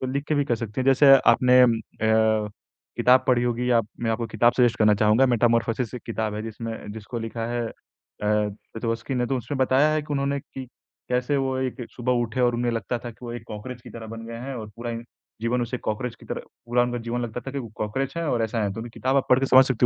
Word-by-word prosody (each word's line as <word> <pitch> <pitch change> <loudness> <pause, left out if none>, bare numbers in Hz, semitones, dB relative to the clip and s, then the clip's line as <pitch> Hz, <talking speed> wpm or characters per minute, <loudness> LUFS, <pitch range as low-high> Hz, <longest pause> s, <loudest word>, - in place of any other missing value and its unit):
तो 130 - -2
लिख 140 +1 -1
के 155 - +2
भी 145 -1 +2
कर 120 - +1
सकती 115 +2 -4
हैं। - - 0
जैसे 135 +1 +7 0.2
आपने 125 +1 +5
अम 120 -2 +5
अ, 110 -1 +1 0.5
किताब 130 +1 +5
पढ़ी 125 -1 +3
होगी 125 +1 0
या 115 -1 +5 0.2
मैं 115 -1 0
आपको 115 +1 -1
किताब 115 +2 +3
सजेस्ट 120 -3 +4
करना 105 -1 +5
चाहूँगा। 110 +5 +4
मेटामॉर्फोसिस 115 0 +1
एक 125 - -7
किताब 110 -2 -2
है 105 - -4
जिसमें 115 0 -5 0.2
जिसको 110 +2 -6
लिखा 115 0 -4
है 120 -1 -2
अ, - - -9 0.5
पेटवोस्की 110 +4 -2
ने। 125 -1 0
तो 135 +1 0
उसमें 135 +3 -5
बताया 130 +3 +4
है 155 - 0
कि 150 0 -6
उन्होंने 140 0 0
कि 130 -1 -9 0.4
कैसे 125 +3 +1
वो 135 -1 0
एक 130 -1 -3
सुबह 125 0 -1
उठे 115 +2 -3
और 120 -1 +3
उन्हें 120 0 0
लगता 115 +1 -2
था 120 0 -7
कि 110 - -17
वो 120 - -5
एक 120 - -6
कॉकरोच 115 +4 -7
की - - -11
तरह 115 -1 -8
बन 115 0 -7
गए 115 0 -7
हैं 135 +2 -5
और 110 -3 -6
पूरा 120 0 -4
इन 115 0 -5 0.4
जीवन 120 +1 +1
उसे 120 +2 -3
कॉकरोच 115 +3 -3
की - - -14
तरह - - -4 0.3
पूरा 120 +1 +3
उनका 120 0 -1
जीवन 120 +1 -1
लगता 120 +1 -4
था 135 - -7
कि 140 - -4
वो 120 -4 -6
कॉकरोच 130 +8 -3
हैं 170 - -1
और 120 -6 0
ऐसा 110 0 -1
है। 100 -1 -1
तो 115 - -6
वो 120 - -7
किताब 130 +1 0
आप 135 - +2
पढ़ 125 - +7
के 135 - +1
समझ 130 0 +7
सकती 125 -1 +1
120 Hz, 255 wpm, -25 LUFS, 115-130 Hz, 0.5 s, जैसे